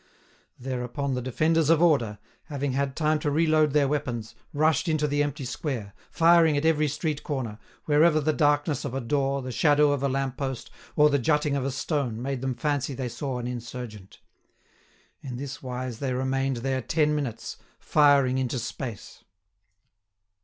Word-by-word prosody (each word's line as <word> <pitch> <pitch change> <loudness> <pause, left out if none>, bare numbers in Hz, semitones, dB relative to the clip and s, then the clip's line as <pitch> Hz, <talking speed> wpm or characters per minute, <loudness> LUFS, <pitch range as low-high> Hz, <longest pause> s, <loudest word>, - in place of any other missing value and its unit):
Thereupon 130 +2 -3
the 125 - -2
defenders 155 +5 +1
of 165 -1 +5
order, 140 -11 +2 0.3
having 145 -2 -3
had 135 +1 -1
time 155 -1 +1
to 150 - -1
reload 155 0 +3
their 145 -2 +3
weapons, 120 -6 -3 0.2
rushed 155 +2 +2
into 155 -1 +1
the 145 0 0
empty 145 -2 -2
square, 120 -7 -4 0.2
firing 165 -2 +4
at 145 - -1
every 155 -2 +3
street 150 +1 -2
corner, 120 -7 -4 0.3
wherever 155 +1 +4
the 155 +1 +1
darkness 145 -2 +1
of 135 -2 -4
a - - 0
door, 135 +1 -1
the 130 - -5
shadow 145 +2 +4
of 145 -2 -1
a 140 - +1
lamp 135 -1 -2
post, 135 -3 -4 0.2
or 150 0 +5
the 140 - +2
jutting 150 +2 +1
of 135 -2 -1
a - - 0
stone 135 -4 -2
made 130 0 -3
them 130 -1 -2
fancy 140 +1 -1
they 130 -2 -3
saw 130 +1 -4
an 120 - -4
insurgent. 120 -4 -7 1.0
In 125 -3 -6
this 140 +1 -6
wise 125 -2 -5
they 135 -2 -2
remained 135 0 -1
there 130 -1 0
ten 150 +5 +1
minutes, 140 -7 -4 0.2
firing 140 -4 +3
into 130 0 -1
space. 120 -1 -6
140 Hz, 170 wpm, -26 LUFS, 125-150 Hz, 1.0 s, of